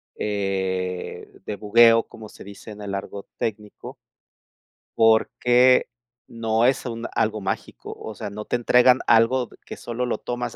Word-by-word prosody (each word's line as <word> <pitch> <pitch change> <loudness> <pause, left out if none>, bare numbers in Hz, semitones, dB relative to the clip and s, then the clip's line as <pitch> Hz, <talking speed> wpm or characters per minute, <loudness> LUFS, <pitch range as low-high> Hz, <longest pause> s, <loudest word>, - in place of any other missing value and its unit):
eh, 95 -3 -3
de 105 - -4
bugueo, 115 +2 +5
como 110 -2 -13
se - - -13
dice 100 +2 -11
en 105 0 -11
el 100 -1 -5
argot 100 0 -7
técnico. 105 -1 -6 1.0
Porque 120 +3 +4 0.4
no 115 0 0
es 130 +1 +1
un 115 -1 -5
algo 110 -1 0
mágico. 95 - -5
O 110 - -9
sea, 100 - -6
no 105 +1 -8
te - - -2
entregan 125 +1 +4
algo 120 +2 +3 0.2
que - - -9
solo 120 +1 -4
lo 120 - -2
tomas 120 -1 -5
110 Hz, 150 wpm, -23 LUFS, 100-120 Hz, 1.0 s, bugueo